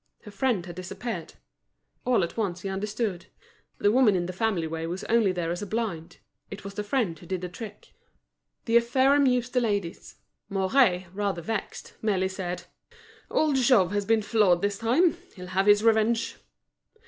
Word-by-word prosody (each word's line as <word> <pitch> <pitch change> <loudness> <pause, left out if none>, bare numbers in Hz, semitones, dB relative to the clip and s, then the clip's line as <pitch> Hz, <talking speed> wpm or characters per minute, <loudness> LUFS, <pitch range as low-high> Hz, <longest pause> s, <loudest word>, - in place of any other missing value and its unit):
Her 210 - -10
friend 205 -3 0
had 175 -2 -8
disappeared. 185 0 -6 0.7
All 245 -7 +3
at 170 - -4
once 185 -6 -2
he 195 - -4
understood: 200 -2 -3 0.5
the 205 - +3
woman 235 -4 +4
in 175 -1 0
the 180 - -5
family 195 -4 0
way 165 0 -4
was 180 +3 -4
only 225 -4 +3
there 175 -2 -2
as 175 - -3
a 205 - -5
blind; 200 -7 -3 0.3
it 200 +1 -8
was 200 0 -7
the 210 - -3
friend 205 -7 -1
who 175 - -14
did 185 0 -3
the 180 - -3
trick. 210 +2 -10 0.7
This 235 0 +4
affair 260 +3 +3
amused 250 -3 +2
the 250 - +3
ladies. 205 -7 -3 0.3
Mouret, 190 -1 +2
rather 195 -4 -2
vexed, 220 +3 -5
merely 190 -3 +1
said: 180 -2 -5 0.7
"Old 300 -3 +2
Jouve 240 -8 +4
has 205 -1 -1
been 220 0 +2
floored 200 -5 +3
this 205 0 0
time. 300 +10 +3 0.2
He'll 180 -2 -8
have 190 +2 0
his 205 +1 +6
revenge." 225 0 +2
205 Hz, 175 wpm, -27 LUFS, 185-230 Hz, 0.7 s, his